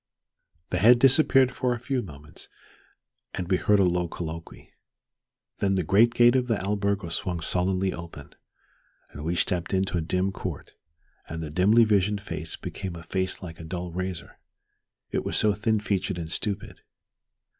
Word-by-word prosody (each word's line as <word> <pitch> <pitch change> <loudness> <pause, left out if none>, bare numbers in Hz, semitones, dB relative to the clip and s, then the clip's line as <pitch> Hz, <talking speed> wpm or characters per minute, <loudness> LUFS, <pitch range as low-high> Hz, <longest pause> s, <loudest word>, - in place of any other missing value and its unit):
The 90 - +1
head 120 +6 +7
disappeared 135 0 +5
for 125 -1 0
a - - -7
few 130 +1 -1
moments 75 -7 -10 0.9
and 90 -2 -3
we 95 0 +2
heard 105 +2 +3
a - - +5
low 90 -1 +1
colloquy. 80 -1 -8 0.9
Then 95 -1 +1
the 95 - +1
great 110 +7 +4
gate 120 +1 +6
of 125 -1 +1
the 115 -3 +1
albergo 100 -1 -1
swung 85 +1 -2
sullenly 95 +3 0
open, 85 -4 -10 0.8
and 75 - -8
we 85 +2 -1
stepped 90 +1 0
into 95 -1 0
a - - -2
dim 90 +4 0
court, - - -6 0.6
and 80 0 -5
the 75 - -6
dimly 100 +8 +5
visioned 105 -1 +2
face - - -6
became 95 -3 -6
a 85 - -9
face 95 +3 -2
like 85 -2 -8
a - - -8
dull 90 +1 -5
razor, 90 0 -5 0.7
it - - -1
was - - -1
so 105 -1 +3
thin 110 +1 0
featured 95 -3 -1
and 80 -2 -5
stupid. 100 -1 -4
95 Hz, 165 wpm, -26 LUFS, 85-105 Hz, 0.9 s, head